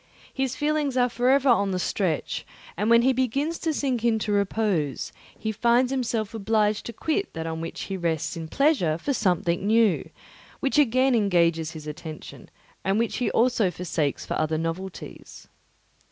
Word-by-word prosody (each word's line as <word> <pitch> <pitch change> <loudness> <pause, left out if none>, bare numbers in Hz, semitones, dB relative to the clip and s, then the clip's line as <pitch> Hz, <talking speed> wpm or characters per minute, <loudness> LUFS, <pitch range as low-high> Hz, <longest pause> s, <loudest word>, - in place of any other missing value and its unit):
His 265 -2 -1
feelings 295 -3 0
are 250 0 +3
for 245 +1 +1
ever 275 0 +4
on 200 -5 +4
the 185 - -1
stretch; 180 -3 -1 0.3
and 210 +5 0
when 235 0 +6
he 260 +1 +4
begins 275 +6 -1
to 325 - 0
sink 265 -6 -1
into 220 -2 +1
repose, 200 -7 0 0.2
he 220 - -2
finds 240 +4 +2
himself 230 -5 -1
obliged 215 -1 0
to 235 - -6
quit 320 - -1
that 160 0 -4
on 160 0 -4
which 165 - -6
he 195 - -4
rests 165 -1 -1
in 165 -1 -6
pleasure 255 - +2
for 280 +12 -2
something 180 -3 0
new, 220 -2 +3 0.5
which 275 +2 +1
again 260 -1 +3
engages 170 -7 +2
his 155 -2 -9
attention, 155 +1 -9 0.3
and 195 +1 +1
which 230 +3 -1
also 240 -2 +2
he - - +2
forsakes 165 -5 -2
for - - -3
other 155 0 0
novelties. 165 +4 -6
215 Hz, 170 wpm, -25 LUFS, 170-255 Hz, 0.5 s, when